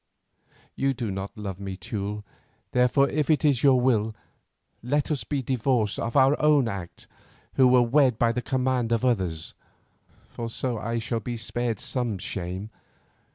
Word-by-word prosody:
You 135 Hz, 0 st, 0 dB
do 120 Hz, -4 st, -3 dB
not 95 Hz, +2 st, -6 dB
love 100 Hz, -3 st, -5 dB
me, 95 Hz, -1 st, -5 dB
Teule, 105 Hz, +1 st, -4 dB, 0.5 s
therefore, 125 Hz, +3 st, +3 dB
if 150 Hz, 0 st, -1 dB
it 155 Hz, 0 st, +3 dB
is 140 Hz, -5 st, +3 dB
your 135 Hz, -3 st, +5 dB
will, 110 Hz, -4 st, +1 dB, 0.7 s
let 145 Hz, +6 st, 0 dB
us 140 Hz, -7 st, -1 dB
be 135 Hz, +4 st, -2 dB
divorced 120 Hz, -4 st, 0 dB
of 115 Hz, +4 st, -1 dB
our 135 Hz, +2 st, +5 dB
own 150 Hz, -4 st, +4 dB
act 95 Hz, -5 st, -6 dB, 0.5 s
who 130 Hz, -, +5 dB
were 125 Hz, -1 st, +5 dB
wed 125 Hz, -1 st, +3 dB
by 115 Hz, 0 st, +3 dB
the 125 Hz, +1 st, -2 dB
command 125 Hz, -2 st, 0 dB
of 115 Hz, +2 st, +1 dB
others, 90 Hz, -10 st, -1 dB, 0.7 s
for 115 Hz, -1 st, -6 dB
so 120 Hz, 0 st, -3 dB
I 115 Hz, +2 st, -2 dB
shall 115 Hz, 0 st, -2 dB
be 120 Hz, +2 st, -5 dB
spared 110 Hz, +1 st, -2 dB
some 120 Hz, -6 st, -2 dB
shame. 95 Hz, 0 st, -5 dB
120 Hz, 160 wpm, -26 LUFS, 105-130 Hz, 0.7 s, your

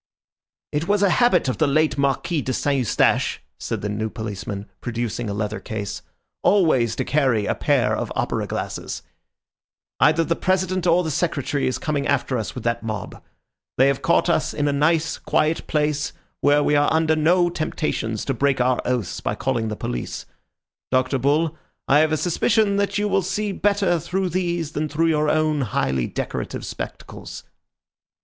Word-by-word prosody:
"It 150 Hz, +3 st, -1 dB
was 205 Hz, 0 st, +2 dB
a 195 Hz, -, +4 dB
habit 190 Hz, -, +3 dB
of 130 Hz, -, -2 dB
the 155 Hz, -, +3 dB
late 155 Hz, +2 st, +2 dB
Marquis 140 Hz, +4 st, 0 dB
de 130 Hz, -, -2 dB
St. 145 Hz, +3 st, 0 dB
Eustache," 120 Hz, -, +2 dB, 0.2 s
said -, -, -3 dB
the 105 Hz, -, -3 dB
new 110 Hz, +2 st, -2 dB
policeman, 105 Hz, -3 st, -5 dB, 0.2 s
producing 120 Hz, -1 st, -3 dB
a -, -, -2 dB
leather 105 Hz, +1 st, -2 dB
case, 105 Hz, -2 st, -5 dB, 0.4 s
"always 135 Hz, -, +3 dB
to -, -, -2 dB
carry 130 Hz, -8 st, +2 dB
a -, -, +1 dB
pair -, -, +1 dB
of -, -, -3 dB
opera -, -, -1 dB
glasses. -, -, -4 dB, 1.0 s
Either 155 Hz, +2 st, +4 dB
the 170 Hz, +1 st, 0 dB
President 185 Hz, 0 st, 0 dB
or 175 Hz, +1 st, +4 dB
the 160 Hz, -, -2 dB
Secretary 145 Hz, -3 st, -1 dB
is 130 Hz, -, -1 dB
coming 145 Hz, -2 st, -1 dB
after 130 Hz, -, 0 dB
us 110 Hz, -, -5 dB
with 125 Hz, -, -6 dB
that 115 Hz, 0 st, 0 dB
mob. 110 Hz, -3 st, -5 dB, 0.6 s
They 130 Hz, -, +5 dB
have 140 Hz, -, -1 dB
caught 170 Hz, -, +3 dB
us 170 Hz, -2 st, +1 dB
in 145 Hz, -1 st, 0 dB
a 145 Hz, -, +1 dB
nice 160 Hz, +3 st, +1 dB
quiet 155 Hz, +2 st, 0 dB
place 150 Hz, -1 st, 0 dB, 0.3 s
where 145 Hz, +1 st, +4 dB
we 150 Hz, -, +2 dB
are 145 Hz, 0 st, +3 dB
under 160 Hz, 0 st, +3 dB
no 175 Hz, +3 st, +3 dB
temptations 135 Hz, -9 st, -2 dB
to 135 Hz, -, 0 dB
break 135 Hz, +1 st, +1 dB
our 125 Hz, 0 st, +2 dB
oaths 125 Hz, -7 st, -2 dB
by -, -, -2 dB
calling 120 Hz, -4 st, -1 dB
the 105 Hz, -, -3 dB
police. -, -, -4 dB, 0.6 s
Dr. 130 Hz, +1 st, +1 dB
Bull, 150 Hz, +5 st, +1 dB, 0.3 s
I 145 Hz, -, +5 dB
have 155 Hz, 0 st, +3 dB
a 155 Hz, -, +2 dB
suspicion 200 Hz, +5 st, +2 dB
that 200 Hz, 0 st, 0 dB
you 205 Hz, 0 st, +1 dB
will 195 Hz, -, +2 dB
see 205 Hz, +3 st, -2 dB
better 195 Hz, -3 st, +1 dB
through 180 Hz, +3 st, -2 dB
these 175 Hz, -3 st, -1 dB
than 155 Hz, 0 st, -2 dB
through 165 Hz, +3 st, +1 dB
your 150 Hz, -1 st, +2 dB
own 155 Hz, -1 st, +2 dB
highly 65 Hz, -, 0 dB
decorative -, -, -4 dB
spectacles." -, -, -7 dB
150 Hz, 175 wpm, -22 LUFS, 125-170 Hz, 1.0 s, They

